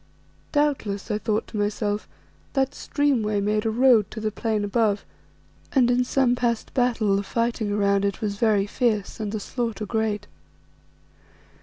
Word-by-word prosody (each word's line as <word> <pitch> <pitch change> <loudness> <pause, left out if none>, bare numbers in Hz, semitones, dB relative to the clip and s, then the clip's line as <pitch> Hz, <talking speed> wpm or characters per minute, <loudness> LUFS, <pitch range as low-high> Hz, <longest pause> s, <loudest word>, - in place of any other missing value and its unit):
Doubtless, 260 -9 0
I 210 - 0
thought 215 0 -1
to 215 - -6
myself, 205 0 -1 0.5
that 270 -1 +1
streamway 245 -11 0
made 210 +2 0
a - - +2
road 230 -3 +4
to 220 - -7
the 215 0 -1
plain 220 -1 -1
above, 205 0 +1 0.7
and 245 -3 +4
in 250 +1 +3
some 250 0 +2
past 235 -2 -1
battle, 235 -6 +2
the 200 - +1
fighting 230 0 -1
around 200 -1 +2
it 200 -1 -1
was 205 -2 -2
very 210 -3 +3
fierce 210 -2 -1
and 210 -2 -3
the 215 - -2
slaughter 230 0 -3
great. 215 -1 -1
215 Hz, 155 wpm, -24 LUFS, 205-240 Hz, 0.7 s, road